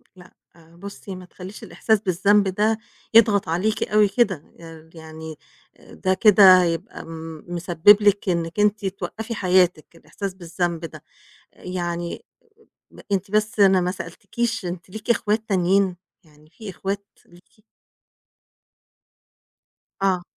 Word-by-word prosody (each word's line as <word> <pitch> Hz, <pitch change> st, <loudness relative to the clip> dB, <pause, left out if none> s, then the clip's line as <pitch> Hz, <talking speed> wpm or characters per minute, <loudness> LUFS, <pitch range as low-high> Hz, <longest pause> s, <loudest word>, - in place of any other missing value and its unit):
لأ، 180 Hz, -1 st, -16 dB, 0.4 s
بُصّي 200 Hz, +1 st, -9 dB
ما 185 Hz, 0 st, -10 dB
تخلّيش 185 Hz, +3 st, -11 dB
الإحساس 220 Hz, -2 st, 0 dB
بالذنب 200 Hz, +1 st, +2 dB
ده 210 Hz, +4 st, +1 dB, 0.4 s
يضغط 205 Hz, -5 st, +5 dB
عليكِ 195 Hz, +7 st, 0 dB
أوي 210 Hz, 0 st, +3 dB
كده، 200 Hz, -7 st, 0 dB, 0.2 s
آآ 165 Hz, -1 st, -13 dB
يعني 160 Hz, -1 st, -10 dB, 0.4 s
آآ -, -, -17 dB
ده 185 Hz, -, 0 dB
كده 190 Hz, -2 st, +7 dB
هيبقى 165 Hz, -1 st, -4 dB
م 160 Hz, -1 st, -9 dB
مسبِّب 175 Hz, +3 st, +4 dB
لِك 205 Hz, -1 st, +2 dB
إنِّك 170 Hz, +1 st, -2 dB
أنتِ 210 Hz, 0 st, +1 dB
توقَّفي 200 Hz, +4 st, -5 dB
حياتِك 180 Hz, -5 st, +1 dB
الإحساس 195 Hz, +3 st, -7 dB
بالذنب 175 Hz, -2 st, -3 dB
ده. 160 Hz, -, -11 dB, 0.5 s
آآ -, -, -21 dB
يعني 175 Hz, -, -4 dB, 0.7 s
لأ، -, -, -16 dB
أنتِ 195 Hz, 0 st, -1 dB
بس 215 Hz, +2 st, 0 dB
أنا 190 Hz, -2 st, +5 dB
ما 180 Hz, 0 st, -1 dB
سألتكيش، 225 Hz, +3 st, -4 dB
أنتِ 175 Hz, +1 st, -7 dB
ليكِ 220 Hz, +4 st, -7 dB
إخوات 220 Hz, -1 st, 0 dB
تانيين؟ 190 Hz, -1 st, +2 dB, 0.3 s
يعني 155 Hz, -1 st, -23 dB
في 210 Hz, +4 st, -9 dB
إخوات 200 Hz, +2 st, -5 dB, 0.2 s
ليكِ؟ 180 Hz, +4 st, -23 dB, 2.4 s
آه. 185 Hz, -2 st, +1 dB
185 Hz, 130 wpm, -22 LUFS, 175-205 Hz, 2.4 s, كده